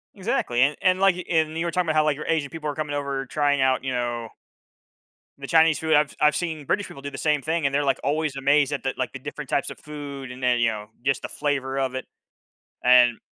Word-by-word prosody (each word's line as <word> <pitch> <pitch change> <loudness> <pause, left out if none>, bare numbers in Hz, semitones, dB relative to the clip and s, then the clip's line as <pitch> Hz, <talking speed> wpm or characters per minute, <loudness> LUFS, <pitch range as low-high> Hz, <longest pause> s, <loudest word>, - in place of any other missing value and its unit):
Exactly, 190 - 0
and 140 +3 +4
and, 185 0 +3
like 190 -2 +3
and 160 -2 +1
you 165 - -1
were 170 - -1
talking 180 -1 0
about 155 - 0
how, 155 - +4
like, 150 -1 +1
your 150 - -7
Asian 155 -4 0
people 155 -1 -5
are 145 - -4
coming 150 -2 -3
over 140 -1 -2
trying 145 0 +1
out, 130 -1 +2
you 135 - -2
know 120 -2 -2 1.1
the 140 0 -8
Chinese 160 0 +4
food, 160 0 0
I've 150 -1 +3
I've 150 0 +4
seen 160 -4 -3
British 205 +7 0
people 140 - -11
do 140 +1 -6
the 135 - -7
same 150 -2 +1
thing 160 +1 -1
and 140 - +1
they're, 145 +1 +2
like, 135 - +1
always 150 0 0
amazed 140 +1 +2
at 140 - -3
the, 135 - -1
like, - - -2
the - - -7
different - - -7
types - - 0
of - - -10
food 140 -3 -8
and 125 +1 -10
then, 125 -1 +2
you 115 -1 +3
know, 105 -1 -5 0.2
just 135 0 +1
the - - -6
flavor 135 -2 -2
of 130 -1 -1
it, 130 - -4 0.8
and 125 -1 +6
145 Hz, 250 wpm, -24 LUFS, 135-155 Hz, 1.1 s, and